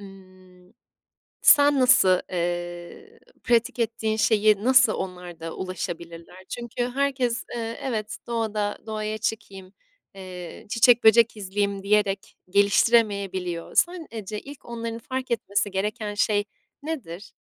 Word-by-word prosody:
ımm, 185 -1 -16 0.7
sen 285 -1 +6
nasıl, 190 -8 +5
eee, 175 - -5 0.3
pratik 235 0 +1
ettiğin 220 -1 -1
şeyi 215 -1 +3
nasıl 255 -3 +5
onlar 180 -3 -6
da 165 0 -6
ulaşabilirler? 175 -1 -7
Çünkü 240 +1 -4
herkes, 260 -3 -1
ııı, 230 - -3 0.2
evet, 220 -5 -3
"Doğada 215 -3 -2
doğaya 215 0 -3
çıkayım, 200 -3 -5 0.4
eee, 185 -2 -9
çiçek, 235 +1 +4
böcek 225 0 +6
izleyeyim." 200 0 -2
diyerek 200 -1 0
geliştiremeyebiliyor. 200 -3 +2
Sen 350 -2 +1
eee, 220 -3 -7
ce 210 +2 -5
ilk 285 0 -12
onların 230 -1 -5
fark 260 +1 -5
etmesi 205 -3 -1
gereken 210 +2 -3
şey 205 -1 +1 0.4
nedir? 220 - -6
210 Hz, 115 wpm, -25 LUFS, 185-235 Hz, 0.7 s, sen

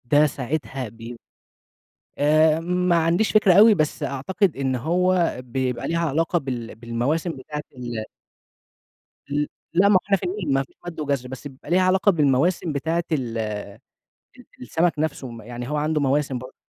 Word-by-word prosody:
ده 145 +5 +4
ساعتها 135 -2 -4
ب 115 +2 -9 1.0
آآ 155 +2 +4
ما 180 +1 +1
عنديش 170 +6 +2
فكرة 210 -3 +5
أوي، 215 +3 +8
بس 155 -2 -1
أعتقد 150 +7 0
إن 135 -1 0
هو 175 +6 +1
بيبقى 125 -1 -2
ليها 170 0 0
علاقة 165 +4 +1
بال 125 -6 -5
بالمواسم 120 +9 -2
بتاعة 150 +3 -6
ال 120 -3 -5 1.3
ل 145 +1 0 0.3
لأ، 185 +4 +5
ما 205 - +5
هو - - +7
إحنا 200 -1 +3
في - - -12
النيل، 180 -6 -2
ما 135 0 +2
فيش 135 - -23
مَد 170 -2 -7
وجَزْر، 140 -4 -2
بس 130 +2 -9
يبقى 135 0 -10
ليها 180 +2 +4
علاقة 190 +2 +4
بالمواسم 155 +2 +2
بتاعة 160 +4 -1
ال 125 -7 -1
ال 105 -2 -2 1.0
السَمَك 160 +7 0
نفسه 150 -3 -2
م 115 -1 -9
يعني 120 +2 -7
هو 150 - -2
عنده 150 +1 0
مواسم 140 -1 +1
برضه، 130 +1 -10
150 Hz, 165 wpm, -23 LUFS, 130-170 Hz, 1.3 s, أوي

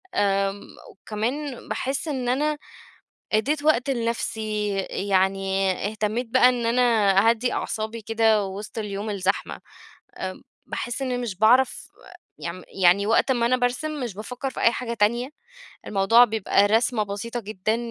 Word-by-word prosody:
آمم 195 0 +1 0.3
وكمان 245 +7 -4
باحس 270 +4 -2
إن 260 -5 -2
أنا 295 +4 +1 0.8
أدّيت 285 +8 +1
وقت 275 -4 +3
لنفسي، 220 -3 -2 0.2
يعني 195 0 +1 0.2
اهتميت 215 +3 -2
بقى 250 +1 +5
إن 245 -2 0
أنا 240 +2 +2 0.5
أهدّي 240 +2 0
أعصابي 220 +1 -3
كده 220 -1 +2
وسط 200 +4 -7
اليوم 210 0 -4
الزحمة. 195 -1 -2 0.6
آمم - - -5 0.2
باحس 240 +2 -4
إني 250 -2 -1
مش 230 -7 -4
باعرف 245 +5 +3 0.5
يم 175 +1 -6 0.2
يعني 185 +3 +5
وقت 225 +4 +3
أمّا 235 -2 +1
أنا 255 +2 +3
بارسم، 270 +5 -1
مش 230 -5 -5
بافكر 250 +6 -5
في - - -7
أي 230 - +4
حاجة 235 0 -4
تانية، 235 +4 +1 0.6
الموضوع 210 +4 +5
بيبقى 215 -2 +2
رسمَة 225 +2 +2
بسيطة 210 +4 -5
جدًا، 215 0 -2
225 Hz, 135 wpm, -24 LUFS, 205-245 Hz, 0.8 s, بقى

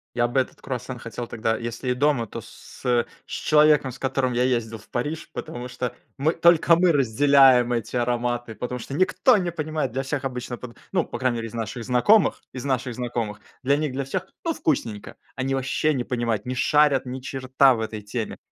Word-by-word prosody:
Я 120 0 +2
бы 120 +2 +1
этот 130 - -3
круассан 125 -1 -5
хотел 120 +1 -6
тогда 115 -1 -1
если 120 +2 -4
и - - +3
дома, 135 -3 +1
то - - -7
с - - -14
с - - -16
э, 120 -1 +3 0.2
с - - -16
человеком, 150 -3 +4
с 125 - -11
которым 135 -1 0
я 125 +1 +2
ездил 115 -3 0
в 105 - -18
Париж. 145 +6 -3
Потому 120 +1 -6
что 125 -1 -4 0.2
мы, 155 +4 +2
только 170 0 +5
мы 175 +1 +4
разделяем 135 -2 +5
эти 115 +1 -3
ароматы, 120 -1 -1
потому 125 0 -4
что 130 +4 -8
никто 185 - +3
не 180 -2 -1
понимает, 155 -4 -2
для 135 +3 -2
всех 135 0 -3
обычно, 125 -2 -4
под 120 -1 -10
ну, 180 -3 +2
по - - -6
крайней 130 -2 0
мере, 115 - -4
из 115 - -12
наших 115 +1 -4
знакомых, 130 - +3
из 130 +1 -6
наших 130 -2 -1
знакомых 115 -4 -3 0.2
для 140 +2 +3
них 150 -2 -1
для 140 - -2
всех, 185 +7 -3 0.2
ну, 330 - +1
вкусненько. 115 - -2 0.2
Они 135 +1 -1
ваще 135 +3 0
не 125 - -1
понимают, 120 -4 -2
не 125 - -2
шарят 145 -1 +3
ни 130 +1 -5
черта 130 0 +3
в - - -5
этой 110 -1 -4
теме, 110 +2 -4
125 Hz, 210 wpm, -24 LUFS, 120-140 Hz, 0.2 s, только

